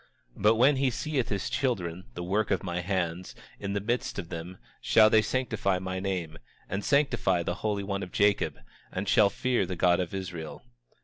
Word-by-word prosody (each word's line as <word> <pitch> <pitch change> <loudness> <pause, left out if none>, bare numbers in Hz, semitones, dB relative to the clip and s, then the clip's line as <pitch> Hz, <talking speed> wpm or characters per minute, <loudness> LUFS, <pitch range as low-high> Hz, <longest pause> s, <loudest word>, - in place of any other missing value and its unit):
27:34 - - -12
But 105 +3 +5
when 130 +5 +5
he 135 0 +2
seeth 135 0 -2
his 100 -2 -2
children, 95 -9 -2
the 90 - -4
work 100 +4 0
of 95 - 0
my 90 -1 -2
hands, 90 -1 -2 0.2
in 100 -1 -3
the 100 - 0
midst 120 +5 -2
of 90 -3 -6
him, 85 +2 -6
they - - -18 0.2
shall 110 0 +6
sanctify 110 -5 0
my 95 0 -4
name, 90 -4 -3 0.3
and 100 +1 -3
sanctify 135 -11 +2
the 90 - -1
Holy 105 -2 -1
One 100 0 -3
of 90 - -6
Jacob, 100 0 +2 0.3
and 95 +2 -4
shall 105 0 +5
fear 120 -2 0
the 90 - -3
God 90 0 +3
of 90 +1 -3
Israel. 90 -4 -6
95 Hz, 195 wpm, -28 LUFS, 90-110 Hz, 0.3 s, shall